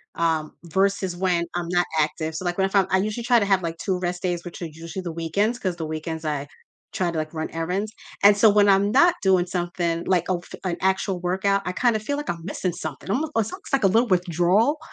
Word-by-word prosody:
um, 160 -2 0
versus 190 +1 0
when 175 -2 +1
I'm 175 -1 -2
not 175 0 +2
active, 155 +1 -1
so 185 - -4
like 175 0 -1
when 190 - +3
if 195 - -6
I'm 195 -2 +4
I 190 - +3
usually 215 +4 -2
try 240 0 +4
to 205 - +1
have 195 -2 +3
like 165 0 -3
2 185 -1 -2
rest 175 0 -3
days, 175 -2 -1
which 175 +1 -8
are - - -2
usually 165 +4 -8
the 170 - -4
weekends, 200 +9 -1
'cause 185 -5 -2
the 160 - -4
weekends 155 +1 -5
I 145 -2 -2 0.5
try 175 -2 0
to 165 - -4
like 155 +1 -3
run 155 0 -3
errands, 180 +6 -2 0.3
and 205 0 +8
so 220 +1 +6
when 205 0 +4
I'm 200 +1 +4
not 345 +8 +5
doing 190 -2 +4
something, 175 -1 -2
like, 180 -3 +2
oh 180 -2 +1
f - - -11
an 175 - 0
actual 190 0 0
workout, 190 +2 +1
I 180 - -1
kind 240 +3 +2
of 215 - -2
feel 285 +6 -2
like 295 - -5
I'm 170 -1 -3
missing 185 -2 -2
something. 155 +1 -7
Almo 280 +10 0
it's 225 -1 0
almost 375 -5 -10
like 270 -6 +2
a - - +7
little 230 +4 +3
withdrawal 180 - +2
180 Hz, 250 wpm, -24 LUFS, 170-200 Hz, 0.5 s, and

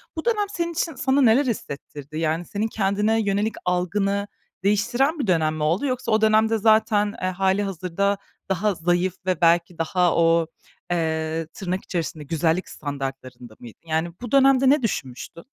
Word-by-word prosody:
Bu 320 - -5
dönem 430 -3 +1
senin 340 -1 -2
için 325 -2 -2
sana 265 +2 +2
neler 255 +4 +5
hissettirdi? 145 - -6
Yani 165 +2 -1
senin 210 +2 -2
kendine 210 +1 +1
yönelik 205 +2 0
algını 195 +3 0 0.4
değiştiren 240 - +1
bir 250 - -1
dönem 160 -4 +2
mi 155 - -3
oldu 170 - +1
yoksa 255 -3 -2
o 215 0 +3
dönemde 220 +1 +3
zaten, 215 -1 +3
eee, 185 - 0
hâlihazırda 195 0 0 0.3
daha 195 +2 0
zayıf 175 +2 0
ve 185 -2 -1
belki 170 0 +3
daha 175 +1 +1
o, 165 -1 +3 0.4
eee, 160 -1 -1
tırnak 185 -1 -4
içerisinde 165 -3 -4
güzellik 165 +4 0
standartlarında 135 -4 -6
mıydın? 120 -3 -13
Yani 160 +2 0
bu 245 - -6
dönemde 270 -1 +5
ne 290 -1 +4
düşünmüştün? 150 - -4
190 Hz, 155 wpm, -23 LUFS, 165-220 Hz, 0.4 s, neler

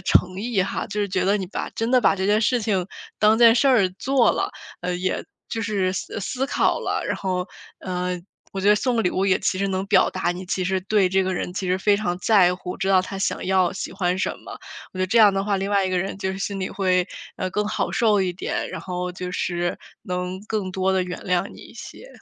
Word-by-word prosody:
诚 185 +1 +2
意 220 -3 +1
哈， 190 - -3
就 210 - -5
是 205 - +1
觉 185 -1 0
得 200 +2 +3
你 195 -3 -3
把 180 - -4
真 225 +1 -1
的 255 -1 +5
把 220 - +4
这 190 - -2
件 210 +1 +3
事 240 +1 +2
情 195 -4 0 0.3
当 215 +1 +4
件 230 -1 +8
事 275 +3 +3
儿 225 -8 +4
做 265 -3 +3
了， - - -1 0.3
呃， 180 0 -2
也 185 +1 -1 0.3
就 225 - -2
是 200 -4 0
思 195 - -4
思 255 +7 -2
考 - - +1
了。 - - -2
然 - - 0
后， 185 -1 -2 0.3
呃， 180 -1 -2 0.3
我 195 - -3
觉 200 - +3
得 - - +7
送 245 +3 0
个 225 - +2
礼 180 - +1
物 190 +1 0
也 190 - +3
其 185 - 0
实 195 0 0
能 190 0 -1
表 - - +4
达 175 -2 -1
你 180 +1 -8
其 185 0 -1
实 190 +1 0
对 200 +1 +2
这 190 +1 +3
个 185 0 -1
人 180 - -3
其 185 0 -3
实 185 - +2
非 205 +2 +3
常 200 -4 -1
在 185 -3 +4
乎， 180 0 -6
知 190 - -1
道 190 -1 +5
他 195 +1 -6
想 195 - -1
要 185 -1 +3
喜 - - -5
欢 180 0 0
什 - - 0
么。 - - -11 0.4
我 - - -7
觉 - - -1
得 185 - +2
这 225 +5 +2
样 210 -3 +7
的 195 0 0
话， 200 -1 0
另 195 +1 -2
外 200 -1 +3
一 185 - -1
个 185 - +1
人 190 +2 -3
就 190 -1 -2
是 190 - -6
心 195 0 -3
里 185 - -3
会， 185 -2 +1 0.3
呃， 185 - -3
更 210 +3 -1
好 - - -1
受 215 -4 +3
一 185 -1 -1
点， 175 - -3
然 - - -5
后 180 0 -4
就 180 0 -5
是 175 -1 -1 0.2
能 180 -2 -4
更 205 -4 -2
多 190 0 +1
地 190 - +2
原 180 0 -6
谅 180 0 +1
你 - - -13
一 - - -14
些。 - - -10
190 Hz, 280 characters per minute, -23 LUFS, 185-205 Hz, 0.4 s, 件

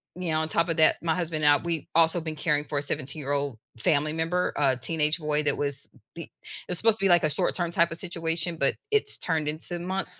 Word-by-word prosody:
Yeah, 165 -4 -1
on 160 - -1
top 170 +1 +1
of 165 - -1
that, 155 - +5
my 160 -1 +1
husband 160 -4 -1
and 145 - +7
I, - - -15
we've 170 -3 -3
also 165 +1 +4
been 160 -1 -5
caring 150 -2 0
for 145 - -4
a - - -4
17-year-old 140 -2 -3 0.2
family 150 +6 +1
member, 165 +3 -1
uh, 135 -3 +3
teenage 150 +4 +1
boy 150 -1 0
that 145 -1 +1
was 140 -1 -3 0.3
be 170 - -6
it - - -14 0.4
was 180 - +2
supposed 225 -1 +3
to 195 - 0
be, 195 - +4
like, 175 -2 +5
a 155 - +2
short-term 170 +3 0
type 170 0 +2
of - - -6
situation, 165 -1 -2
but 140 - +1 0.2
it's 430 0 +2
turned 160 -3 -1
into 165 +3 -5
months 180 +1 -4
160 Hz, 235 wpm, -26 LUFS, 150-170 Hz, 0.4 s, and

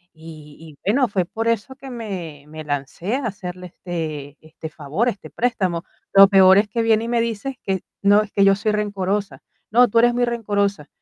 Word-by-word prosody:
y 155 -2 -12
y 155 -3 -14
bueno, 260 0 +2
fue 190 -3 -1
por 225 +5 -4
eso 230 +3 -1
que 270 -1 -11
me 185 - -7
me 155 +1 -9
lancé 150 - -3
a 275 -3 -3
hacerle 180 -2 -7
este 155 -5 -6
este 160 0 -10
favor, 160 - -1
este 200 - -8
préstamo. 190 -8 -1 0.3
Lo 195 0 +9
peor 190 -1 +7
es 210 - +1
que 230 +2 -1
viene 225 0 +2
y - - -5
me 235 -1 +1
dice 235 +3 -4
que 190 -2 -1 0.2
no, 205 +1 +5
es 210 - -12
que 200 - +3
yo 195 0 +5
soy 205 +2 -1
rencorosa: 200 -6 -2 0.3
"No, 245 +3 +6
tú 230 - -1
eres 240 +1 +4
muy 245 0 +1
rencorosa". 205 -8 -1
195 Hz, 200 wpm, -21 LUFS, 165-230 Hz, 0.3 s, Lo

